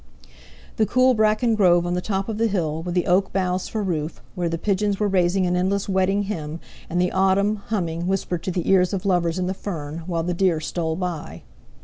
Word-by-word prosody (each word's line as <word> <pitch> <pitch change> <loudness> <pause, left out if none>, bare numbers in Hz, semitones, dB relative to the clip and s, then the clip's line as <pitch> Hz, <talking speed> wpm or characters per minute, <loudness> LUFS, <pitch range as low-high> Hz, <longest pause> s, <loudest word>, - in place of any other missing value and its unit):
The 215 - +2
cool 255 0 +4
bracken 220 +1 +2
grove 175 -5 +4
on 175 - -1
the 180 - -1
top 195 0 -2
of 220 -1 -4
the 230 - +3
hill, 165 -6 -1
with 175 +1 -4
the 180 - +2
oak 190 +2 +2
boughs 185 -1 -1
for 215 -2 -3
roof, 160 -4 -3
where 175 -3 -1
the 165 - -2
pigeons 200 +2 0
were 210 - +2
raising 185 -1 +2
an 180 0 +1
endless 190 +2 0
wedding 195 +1 +1
hymn, 165 -6 -5 0.3
and 175 - -1
the 180 0 +2
autumn, 195 +2 +2
humming, 175 -5 -2
whispered 185 -2 -1
to 185 - -1
the 175 -1 -2
ears 185 -1 +4
of 190 -1 -3
lovers 175 -3 +1
in 185 - -1
the 185 - -1
fern, 160 -6 -5
while 170 -2 -1
the 180 +1 -1
deer 175 -2 +2
stole 160 0 -2
by. 175 -3 -5
185 Hz, 220 wpm, -23 LUFS, 175-200 Hz, 0.3 s, cool